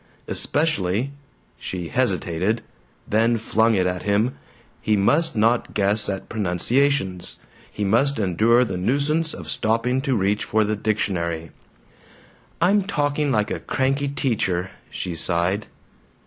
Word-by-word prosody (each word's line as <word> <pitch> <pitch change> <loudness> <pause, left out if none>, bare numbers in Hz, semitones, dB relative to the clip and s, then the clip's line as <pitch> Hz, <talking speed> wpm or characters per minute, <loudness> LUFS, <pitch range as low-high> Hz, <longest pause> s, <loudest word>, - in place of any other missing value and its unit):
Especially 130 - 0 0.5
she 90 -3 -5
hesitated, 100 -2 0 0.4
then 115 +2 +2
flung 110 +1 +2
it 95 -2 +2
at 90 0 -1
him 105 +5 +1 0.5
he 110 -2 +2
must 150 +11 +2
not 115 +2 +1
guess 105 +1 +1
at 95 -1 -4
pronunciations; 105 0 0 0.3
he 105 - -4
must 125 +8 +2
endure 110 +5 +3
the 95 -5 -4
nuisance 145 - +1
of - - -7
stopping 115 +4 0
to 135 -2 0
reach 100 +1 +1
for 110 0 +1
the 105 +1 0
dictionary. 85 -6 -2 1.1
"I'm 195 +4 +4
talking 145 -5 0
like 105 -3 +1
a - - -2
cranky 135 +2 0
teacher," 100 -10 -1 0.2
she 90 - -4
sighed. 85 +5 0
110 Hz, 125 wpm, -23 LUFS, 95-130 Hz, 1.1 s, I'm